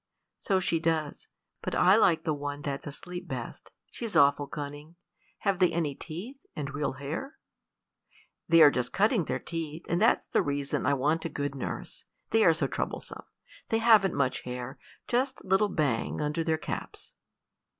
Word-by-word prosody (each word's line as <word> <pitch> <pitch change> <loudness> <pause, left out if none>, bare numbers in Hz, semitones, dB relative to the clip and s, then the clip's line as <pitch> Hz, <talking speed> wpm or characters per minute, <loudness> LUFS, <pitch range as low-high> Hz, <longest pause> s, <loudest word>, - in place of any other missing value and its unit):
"So 195 -2 +1
she 170 -2 +1
does; 160 -2 -1 0.3
but - - -3
I 185 +2 +6
like 180 -7 +4
the 155 - 0
one 145 0 -5
that's 140 +1 -4
asleep 175 +5 -7
best. - - -6 0.2
She's 230 -3 -5
awful 140 0 +5
cunning. 145 +3 -7 0.5
Have 195 -2 +1
they 180 -2 +4
any 160 -4 -1
teeth, 180 - -8 0.2
and 140 -2 -4
real 145 0 -1
hair?" 155 - -6 1.1
"They 165 -1 +8
are 145 - +8
just 125 -1 -2
cutting 210 -2 +3
their 130 - -1
teeth, 165 +2 -6
and 175 +2 0
that's 230 - +4
the - - +1
reason 140 -1 -1
I 140 - +4
want 150 +5 0
a - - -1
good 145 -2 -3
nurse; 135 - -6 0.3
they 225 0 +4
are 165 - +7
so 160 -3 0
troublesome. 135 - -4 0.5
They 225 - +2
haven't 220 -4 +5
much 135 -2 0
hair, 125 +1 -6 0.3
just 260 +2 0
a - - -15
little 195 +2 +3
bang 145 -11 0
under 150 +2 -1
their 160 -1 +1
caps." 155 - -6
160 Hz, 170 wpm, -29 LUFS, 145-185 Hz, 1.1 s, They